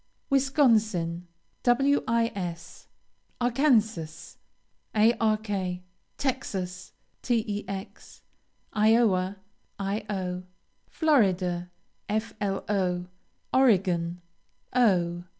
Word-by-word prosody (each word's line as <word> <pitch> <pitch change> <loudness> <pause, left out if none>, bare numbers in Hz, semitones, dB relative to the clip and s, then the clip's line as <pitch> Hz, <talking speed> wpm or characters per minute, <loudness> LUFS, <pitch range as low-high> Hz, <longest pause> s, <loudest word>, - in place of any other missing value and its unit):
Wisconsin, 220 - +2 0.4
Wis. 230 -9 0 0.5
Arkansas, 230 - +1 0.6
Ark. 220 0 +3 0.7
Texas, 195 -9 -3 0.3
Tex. 205 -5 -4 0.5
Iowa, 210 -4 +3 0.4
Io. 195 -3 -3 0.4
Florida, 185 - +1 0.4
Flo. 200 -4 -1 0.5
Oregon, 180 -9 +2 0.5
O. 175 -8 +2
210 Hz, 45 wpm, -27 LUFS, 180-235 Hz, 0.7 s, Ark